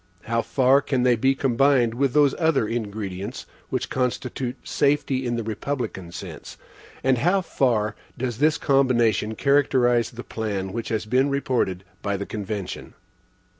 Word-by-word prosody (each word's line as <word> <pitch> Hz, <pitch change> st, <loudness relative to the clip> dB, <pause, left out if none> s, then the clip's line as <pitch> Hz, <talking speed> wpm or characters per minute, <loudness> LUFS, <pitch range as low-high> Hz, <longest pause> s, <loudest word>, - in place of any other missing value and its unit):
How 115 Hz, 0 st, 0 dB
far 135 Hz, +2 st, +3 dB
can 130 Hz, -3 st, 0 dB
they 125 Hz, -1 st, +4 dB
be 135 Hz, +4 st, +2 dB
combined 130 Hz, -2 st, +3 dB
with 130 Hz, +1 st, 0 dB
those 145 Hz, -2 st, +5 dB
other 160 Hz, -9 st, +2 dB
ingredients 105 Hz, -1 st, -4 dB, 0.2 s
which 130 Hz, -, -2 dB
constitute 125 Hz, 0 st, -2 dB
safety 140 Hz, -2 st, +1 dB
in 120 Hz, -, -1 dB
the 115 Hz, -, -2 dB
republican 110 Hz, -5 st, -4 dB
sense? -, -, -9 dB, 0.5 s
And 130 Hz, -2 st, +3 dB
how 180 Hz, +8 st, +3 dB
far 115 Hz, -, 0 dB, 0.2 s
does 120 Hz, -2 st, -3 dB
this 155 Hz, +2 st, +3 dB
combination 120 Hz, -, +2 dB
characterize 130 Hz, -4 st, +3 dB
the 120 Hz, +1 st, -9 dB
plan 100 Hz, -4 st, -4 dB
which 115 Hz, -1 st, -4 dB
has 110 Hz, -1 st, -1 dB
been 130 Hz, +5 st, +2 dB
reported 125 Hz, -9 st, -1 dB, 0.2 s
by 100 Hz, -1 st, -1 dB
the 100 Hz, -, -4 dB
convention? 105 Hz, -2 st, -5 dB
120 Hz, 145 wpm, -24 LUFS, 110-135 Hz, 0.5 s, those